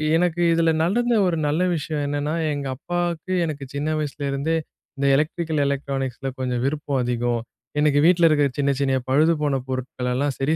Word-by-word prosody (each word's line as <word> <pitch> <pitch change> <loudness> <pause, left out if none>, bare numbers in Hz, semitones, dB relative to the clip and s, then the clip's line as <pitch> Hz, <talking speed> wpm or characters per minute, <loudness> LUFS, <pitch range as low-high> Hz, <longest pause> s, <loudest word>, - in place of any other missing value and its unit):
எனக்கு 175 0 +1
இதுல 165 0 +3
நடந்த 235 +8 +2
ஒரு 170 -2 0
நல்ல 155 +4 +1
விஷயம் 150 -1 -3
என்னன்னா, 145 +2 -1 0.2
எங்க 140 -1 -4
அப்பாவுக்கு, 175 +2 -3
எனக்கு 150 -3 -4
சின்ன 145 +2 -1
வயசுலேருந்தே, 145 +1 -1 0.4
இந்த 140 - -1
எலக்ட்ரிக்கல் 155 +1 0
எலக்ட்ரானிக்ஸ்ல 135 -1 -2
கொஞ்சம் 125 -2 -1
விருப்பம் 140 -1 -1
அதிகம். 120 -1 0 0.4
"எனக்கு 150 -1 +3
வீட்ல 175 -1 +6
இருக்கிற 145 -2 +3
சின்ன 140 0 +2
சின்ன 135 -1 +2
பழுதுபோன 150 0 +2
பொருட்களெல்லாம் 130 +1 -2
சரி 145 +4 +1
145 Hz, 150 wpm, -23 LUFS, 135-165 Hz, 0.4 s, வீட்ல